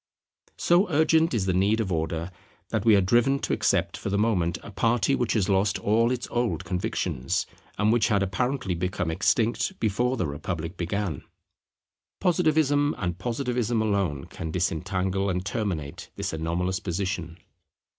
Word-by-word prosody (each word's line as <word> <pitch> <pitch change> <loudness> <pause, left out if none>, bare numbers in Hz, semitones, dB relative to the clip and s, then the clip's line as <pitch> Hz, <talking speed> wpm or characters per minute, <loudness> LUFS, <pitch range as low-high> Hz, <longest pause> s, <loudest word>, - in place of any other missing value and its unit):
So 180 +4 +3
urgent 160 +1 +3
is 110 -6 0
the 95 - +1
need 100 +5 +2
of 105 -4 -1
Order 80 +1 -2 0.4
that - - -1
we 110 -2 +7
are 100 - +5
driven 120 +8 +3
to - - -1
accept - - +1
for - - -4
the 100 - 0
moment 90 -6 +1
a 115 - -9
party 115 +4 +2
which 125 -4 +1
has 105 -5 +1
lost 95 0 +2
all 115 +3 +2
its 125 -1 -2
old 120 -11 -1
convictions, 90 +1 -1 0.3
and 105 +2 +3
which 115 -3 +3
had 100 -2 +2
apparently 110 +2 -1
become 90 -1 -2
extinct 115 - +1
before 120 +4 +1
the 90 - 0
Republic 80 +4 -4
began. 90 -3 -2 1.0
Positivism 155 -5 +2
and 90 -2 -3
Positivism 120 0 -1
alone 100 -10 0
can 80 - -6
disentangle 90 +3 -1
and 90 0 -2
terminate 95 -10 -3
this - - -3
anomalous 85 +4 -1
position. 90 -3 -3
100 Hz, 155 wpm, -26 LUFS, 90-120 Hz, 1.0 s, we